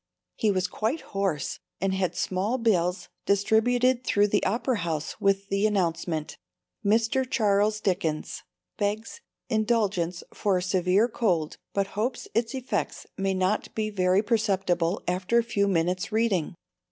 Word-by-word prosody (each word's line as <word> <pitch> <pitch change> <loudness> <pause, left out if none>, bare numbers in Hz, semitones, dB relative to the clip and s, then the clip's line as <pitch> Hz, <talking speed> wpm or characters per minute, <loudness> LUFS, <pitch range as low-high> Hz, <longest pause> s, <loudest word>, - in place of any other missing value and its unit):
He 220 - +1
was 185 -2 +1
quite 220 - -2
hoarse 195 -7 -2 0.2
and 195 0 0
had 190 -2 -1
small 195 +7 0
bills 185 -6 +1 0.2
distributed 240 +5 +3
through 205 -3 +2
the 205 - +1
Opera 235 +2 0
House 160 -3 -3
with 195 0 +1
the 195 +2 +2
announcement: 170 -5 -1 0.4
MR. 225 +5 +2
CHARLES 210 -3 +2
DICKENS 180 -5 -1 0.4
Begs 215 - -2 0.3
indulgence 210 -7 0
for 200 -3 +1
a 180 - -2
Severe 185 +3 +2
Cold, 180 -10 0
but 195 -1 -1
hopes 235 +5 -2
its 230 +3 0
effects 260 -1 -3
may 195 0 0
not 185 +3 0
be 215 -1 -1
very 185 0 +2
perceptible 195 -5 +1
after 185 +6 +1
a 235 - +4
few 200 -3 0
minutes' 180 +1 0
Reading. 210 -8 +1
200 Hz, 140 wpm, -27 LUFS, 185-220 Hz, 0.4 s, a